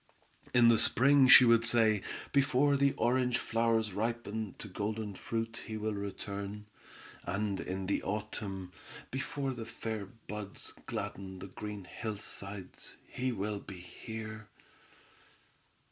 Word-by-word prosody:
In 120 Hz, -1 st, +7 dB
the 115 Hz, -2 st, +6 dB
spring 130 Hz, +4 st, +6 dB
she 130 Hz, -, +11 dB
would 115 Hz, -1 st, +6 dB
say: 115 Hz, -3 st, +4 dB, 0.3 s
"Before 140 Hz, 0 st, +4 dB
the 140 Hz, 0 st, +3 dB
orange 125 Hz, 0 st, +2 dB
flowers 115 Hz, -2 st, +1 dB
ripen 110 Hz, -1 st, -2 dB
to -, -, -8 dB
golden 105 Hz, +2 st, -3 dB
fruit 115 Hz, +3 st, -3 dB
he 110 Hz, -1 st, -4 dB
will 110 Hz, 0 st, -1 dB
return," 100 Hz, +1 st, -5 dB, 0.6 s
and 100 Hz, +2 st, -1 dB
in 95 Hz, +1 st, -3 dB
the 100 Hz, -, 0 dB
autumn, 100 Hz, -2 st, -4 dB, 0.4 s
"before 135 Hz, +1 st, -2 dB
the 115 Hz, -2 st, -6 dB
fair 110 Hz, -3 st, -4 dB
buds 105 Hz, -3 st, -7 dB
gladden 95 Hz, -1 st, -4 dB
the 95 Hz, +1 st, -8 dB
green 105 Hz, +1 st, -6 dB
hillsides 100 Hz, -1 st, -6 dB
he 130 Hz, +1 st, -1 dB
will 105 Hz, -1 st, -2 dB
be 100 Hz, -1 st, -9 dB
here!" 110 Hz, +4 st, -7 dB
110 Hz, 125 wpm, -33 LUFS, 100-115 Hz, 0.6 s, she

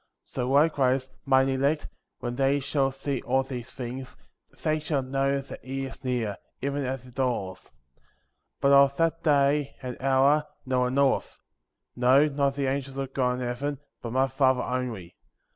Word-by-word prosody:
So 125 Hz, 0 st, -3 dB
likewise, 135 Hz, -3 st, +3 dB
mine 135 Hz, -1 st, +4 dB
elect, 140 Hz, +3 st, +1 dB, 0.3 s
when 120 Hz, 0 st, -3 dB
they 135 Hz, +2 st, +2 dB
shall 140 Hz, 0 st, +1 dB
see 135 Hz, -1 st, -3 dB
all 130 Hz, +1 st, +1 dB
these 130 Hz, -2 st, -6 dB
things, 130 Hz, +1 st, -7 dB, 0.5 s
they 155 Hz, 0 st, +1 dB
shall 150 Hz, -3 st, -1 dB
know 135 Hz, +1 st, 0 dB
that 135 Hz, -, -10 dB
he 135 Hz, +1 st, -4 dB
is 130 Hz, -, -9 dB
near, 120 Hz, -6 st, -1 dB, 0.2 s
even 140 Hz, +1 st, -2 dB
at 130 Hz, -1 st, -3 dB
the 130 Hz, -, -14 dB
doors; 120 Hz, -8 st, -2 dB
40. -, -, -24 dB, 0.9 s
But 140 Hz, -, +4 dB
of 140 Hz, 0 st, +6 dB
that 165 Hz, 0 st, +1 dB
day, 145 Hz, -1 st, +2 dB
and 125 Hz, 0 st, -6 dB
hour, 135 Hz, +3 st, +3 dB, 0.2 s
no 130 Hz, -1 st, +1 dB
one 125 Hz, +1 st, +1 dB
knoweth; 140 Hz, -1 st, +1 dB, 0.6 s
no, 130 Hz, +4 st, +5 dB
not 140 Hz, -2 st, 0 dB
the 140 Hz, -1 st, -1 dB
angels 135 Hz, 0 st, -2 dB
of 135 Hz, -1 st, -4 dB
God 125 Hz, -2 st, +1 dB
in 125 Hz, -, -4 dB
heaven, 130 Hz, +4 st, -2 dB, 0.2 s
but 120 Hz, -, -5 dB
my 130 Hz, +2 st, +3 dB
Father 130 Hz, -1 st, +2 dB
only. 120 Hz, -9 st, -4 dB
135 Hz, 170 wpm, -27 LUFS, 125-140 Hz, 0.9 s, of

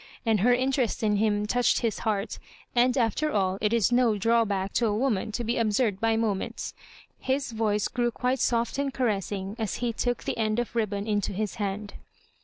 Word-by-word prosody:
And 220 Hz, -2 st, +3 dB
her 235 Hz, +6 st, +4 dB
interest 255 Hz, -2 st, +1 dB
in 210 Hz, -1 st, +2 dB
him 210 Hz, 0 st, +1 dB
touched 245 Hz, +3 st, +2 dB
his 230 Hz, -3 st, -1 dB
heart; 210 Hz, -1 st, -2 dB, 0.4 s
and, 250 Hz, +2 st, +3 dB
after 255 Hz, +6 st, +1 dB
aU, 190 Hz, -1 st, 0 dB
it 210 Hz, 0 st, +1 dB
is 230 Hz, -1 st, +2 dB
no 240 Hz, -3 st, +3 dB
drawbadc 205 Hz, -3 st, +1 dB
to 235 Hz, -, +2 dB
a 210 Hz, -1 st, 0 dB
woman 225 Hz, -4 st, 0 dB
to 240 Hz, -, -2 dB
be 235 Hz, +1 st, -1 dB
ab 220 Hz, -2 st, +2 dB
surd 205 Hz, -4 st, +1 dB
by 225 Hz, 0 st, +2 dB
moments. 215 Hz, -4 st, -2 dB, 0.5 s
His 265 Hz, 0 st, -1 dB
voice 215 Hz, -2 st, 0 dB
grew 240 Hz, -1 st, 0 dB
quite 250 Hz, +2 st, -1 dB
soft 235 Hz, +3 st, 0 dB
and 280 Hz, -1 st, 0 dB
caressmg 205 Hz, -4 st, -2 dB
as 220 Hz, -3 st, -2 dB
he 240 Hz, -1 st, -2 dB
took 245 Hz, +2 st, -1 dB
the -, -, -3 dB
end 215 Hz, 0 st, +1 dB
of 240 Hz, 0 st, -2 dB
ribbon 205 Hz, -3 st, -1 dB
into 205 Hz, -3 st, -1 dB
his 210 Hz, +3 st, -3 dB
hand. 205 Hz, +1 st, -3 dB
225 Hz, 200 wpm, -27 LUFS, 205-240 Hz, 0.5 s, her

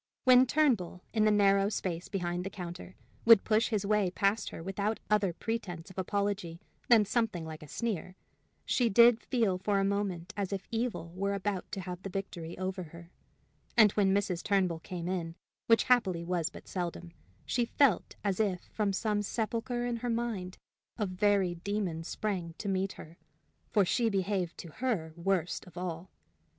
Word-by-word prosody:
When 255 Hz, 0 st, +7 dB
Turnbull, 235 Hz, -, +1 dB
in 215 Hz, -1 st, +3 dB
the -, -, +5 dB
narrow 200 Hz, -1 st, +4 dB
space 180 Hz, -4 st, -3 dB
behind 175 Hz, -2 st, -2 dB
the 195 Hz, -, -4 dB
counter, 180 Hz, -1 st, -8 dB, 0.3 s
would 230 Hz, -3 st, +8 dB
push 220 Hz, +1 st, +2 dB
his 210 Hz, -3 st, 0 dB
way 210 Hz, -2 st, +2 dB
past 200 Hz, +4 st, +1 dB
her -, -, -8 dB
without 200 Hz, +4 st, -2 dB
other 205 Hz, -3 st, +3 dB
pretense 180 Hz, -2 st, -4 dB
of 190 Hz, -, -16 dB
apology 200 Hz, -3 st, -2 dB, 0.3 s
than 225 Hz, -3 st, +7 dB
something 210 Hz, -6 st, 0 dB
like 160 Hz, -1 st, -8 dB
a 150 Hz, -, -10 dB
sneer, 190 Hz, -2 st, -3 dB, 0.5 s
she 245 Hz, -3 st, +2 dB
did 235 Hz, +2 st, +6 dB
feel 220 Hz, -8 st, +1 dB
for 200 Hz, +1 st, +1 dB
a -, -, +2 dB
moment 195 Hz, -2 st, -2 dB
as 200 Hz, -2 st, -2 dB
if 195 Hz, -1 st, -4 dB
evil 225 Hz, -8 st, -2 dB
were 200 Hz, +2 st, -1 dB
about 195 Hz, -1 st, -3 dB
to 195 Hz, -, -3 dB
have 180 Hz, 0 st, -6 dB
the 195 Hz, -, -5 dB
victory 180 Hz, -3 st, -5 dB
over 185 Hz, +1 st, -3 dB
her; 170 Hz, +2 st, -13 dB, 0.7 s
and 215 Hz, -3 st, +8 dB
when 195 Hz, -2 st, +2 dB
Mrs. 190 Hz, -3 st, 0 dB
Turnbull 185 Hz, -5 st, +1 dB
came 175 Hz, 0 st, -6 dB
in, 170 Hz, -3 st, -3 dB, 0.3 s
which 230 Hz, 0 st, +5 dB
happily 195 Hz, -9 st, +2 dB
was 170 Hz, -2 st, -1 dB
but -, -, -13 dB
seldom, 175 Hz, -1 st, -4 dB, 0.3 s
she 245 Hz, -, +1 dB
felt 260 Hz, -, +2 dB
as 200 Hz, -2 st, 0 dB
if 195 Hz, -5 st, +1 dB
from 205 Hz, -2 st, 0 dB
some 210 Hz, +1 st, 0 dB
sepulchre 230 Hz, +3 st, -2 dB
in 240 Hz, -1 st, -1 dB
her 245 Hz, +1 st, -3 dB
mind 225 Hz, -6 st, -2 dB, 0.4 s
a 215 Hz, -, 0 dB
very 190 Hz, -1 st, +2 dB
demon 175 Hz, -2 st, -3 dB
sprang 180 Hz, -3 st, -3 dB
to 205 Hz, -, -5 dB
meet 190 Hz, 0 st, 0 dB
her. 165 Hz, +2 st, -12 dB, 0.5 s
For 205 Hz, -4 st, +3 dB
she 230 Hz, +5 st, +2 dB
behaved 190 Hz, -3 st, -1 dB
to 170 Hz, -, -10 dB
her 190 Hz, -8 st, -2 dB
worst 180 Hz, -1 st, -1 dB
of 180 Hz, -, -14 dB
all. 175 Hz, 0 st, -4 dB
195 Hz, 175 wpm, -31 LUFS, 180-215 Hz, 0.7 s, would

